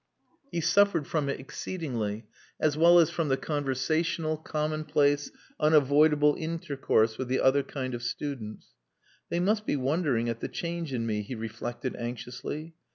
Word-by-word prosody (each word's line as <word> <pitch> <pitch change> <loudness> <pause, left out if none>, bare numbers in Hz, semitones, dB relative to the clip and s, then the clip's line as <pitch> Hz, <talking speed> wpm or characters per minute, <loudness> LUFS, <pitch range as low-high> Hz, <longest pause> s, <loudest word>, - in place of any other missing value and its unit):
He 170 - -1
suffered 200 -3 +3
from 150 -2 -1
it 140 - -2
exceedingly, 120 - -4 0.3
as 150 -2 +2
well 170 +3 +6
as 165 -3 +5
from 165 -2 -1
the 135 -1 +2
conversational, 155 +3 -1
commonplace, 150 -2 0 0.3
unavoidable 150 0 +4
intercourse 145 -9 0
with 130 - -2
the 130 +1 +1
other 135 +2 +4
kind 130 -2 -5
of 120 - -4
students. 120 -3 -5 0.6
"They 170 - 0
must 210 +4 +1
be - - +1
wondering 135 -3 0
at 115 -1 -2
the - - -3
change 170 -3 -4
in 120 -3 -1
me," 105 -2 -1
he 105 +5 -6
reflected 115 +3 -5
anxiously. 125 +6 -6
145 Hz, 150 wpm, -28 LUFS, 125-160 Hz, 0.6 s, well